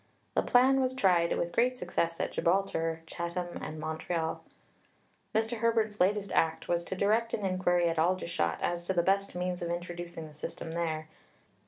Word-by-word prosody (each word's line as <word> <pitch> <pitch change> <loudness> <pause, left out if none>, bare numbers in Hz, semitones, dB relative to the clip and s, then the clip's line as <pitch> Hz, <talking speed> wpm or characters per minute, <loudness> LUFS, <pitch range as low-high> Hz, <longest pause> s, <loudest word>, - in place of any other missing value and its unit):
The - - +3
plan 265 +2 +4
was 260 0 0
tried 180 -8 +3
with 170 - -1
great 250 +6 +2
success 170 -8 -1
at - - -1
Gibraltar, 165 -3 0
Chatham, 170 +1 -4
and 155 - -5
Montreal. 160 +1 -2 0.9
Mr. 225 +2 +1
Herbert's 220 -2 +1
latest 200 +2 +2
act 160 0 +1
was 170 0 +1
to 190 - -4
direct 220 +4 +2
an 205 - -4
inquiry 180 -2 +2
at 165 -1 0
Aldershot 170 - +1
as 175 0 -1
to 190 - 0
the 170 -2 +2
best 195 +1 +1
means 180 0 -2
of 170 - -2
introducing 175 -1 -5
the 150 - -14
system 155 +2 -6
there." 160 -2 -2
175 Hz, 170 wpm, -30 LUFS, 170-200 Hz, 0.9 s, plan